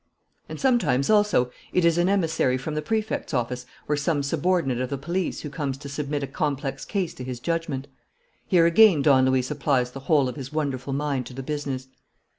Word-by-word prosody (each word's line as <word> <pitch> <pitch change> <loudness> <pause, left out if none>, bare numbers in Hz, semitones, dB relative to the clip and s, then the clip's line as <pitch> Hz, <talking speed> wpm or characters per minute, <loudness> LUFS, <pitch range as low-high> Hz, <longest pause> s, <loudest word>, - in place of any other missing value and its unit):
And - - -6
sometimes 180 - +2
also 205 - +3 0.2
it 180 - +3
is 170 0 +3
an 175 +2 +3
emissary 165 -9 +1
from 140 +4 -5
the 155 - -1
Prefect's 215 -3 -2
office 125 +1 -2 0.2
or 150 - +1
some 145 0 0
subordinate 145 -3 0
of 130 - -2
the 140 - -2
police 170 +6 -2
who 150 - -6
comes 140 -4 -3
to 140 - -9
submit 145 0 -3
a - - 0
complex 140 -1 -3
case 190 -4 -2
to 125 - -8
his 125 -1 -5
judgment. 155 -3 -2 0.6
Here 175 -4 +4
again 170 -3 +6
Don 130 -3 +5
Luis 130 0 +1
applies 135 -4 +1
the 135 - -7
whole 145 -5 +4
of 125 - -5
his 135 -1 -7
wonderful 140 -3 -2
mind 140 -3 -1
to 125 - -10
the 135 - -5
business. 135 -2 -4
145 Hz, 200 wpm, -25 LUFS, 130-165 Hz, 0.6 s, again